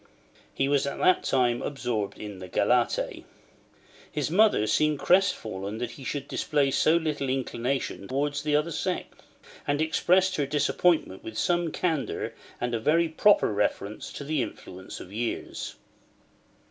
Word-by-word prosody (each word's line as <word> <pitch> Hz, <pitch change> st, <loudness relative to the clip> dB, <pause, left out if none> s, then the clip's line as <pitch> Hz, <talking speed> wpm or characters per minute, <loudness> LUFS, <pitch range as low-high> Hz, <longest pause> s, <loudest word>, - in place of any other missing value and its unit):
He 135 Hz, -, 0 dB
was 140 Hz, -1 st, +2 dB
at 140 Hz, -, -3 dB
that 185 Hz, -, +3 dB
time 125 Hz, -2 st, +2 dB
absorbed 115 Hz, -8 st, -3 dB
in 105 Hz, -3 st, -7 dB
the 95 Hz, -, -8 dB
galette. -, -, +2 dB, 1.1 s
His 150 Hz, 0 st, -2 dB
mother 205 Hz, -, +4 dB
seemed 150 Hz, +7 st, +2 dB
crestfallen 110 Hz, -, +1 dB
that 120 Hz, 0 st, -3 dB
he 135 Hz, -, -11 dB
should 140 Hz, +1 st, -4 dB
display 145 Hz, -3 st, +1 dB
so 160 Hz, +4 st, +4 dB
little 150 Hz, -5 st, -2 dB
inclination 130 Hz, -4 st, -2 dB
towards 145 Hz, +2 st, -1 dB
the 150 Hz, 0 st, +1 dB
other 150 Hz, +3 st, +1 dB
sex; 180 Hz, +3 st, -3 dB, 0.5 s
and 145 Hz, 0 st, +1 dB
expressed 185 Hz, +4 st, +2 dB
her 145 Hz, -2 st, 0 dB
disappointment 150 Hz, -, +1 dB
with 110 Hz, -, -7 dB
some 175 Hz, -2 st, +1 dB
candour 160 Hz, -5 st, -2 dB, 0.3 s
and 120 Hz, 0 st, -2 dB
a 115 Hz, -, 0 dB
very 165 Hz, +7 st, +3 dB
proper 180 Hz, -, +4 dB
reference 105 Hz, 0 st, -2 dB
to -, -, -6 dB
the 150 Hz, -1 st, 0 dB
influence 95 Hz, -5 st, -7 dB
of 95 Hz, -, -11 dB
years. 115 Hz, +2 st, -4 dB
140 Hz, 145 wpm, -27 LUFS, 115-160 Hz, 1.1 s, mother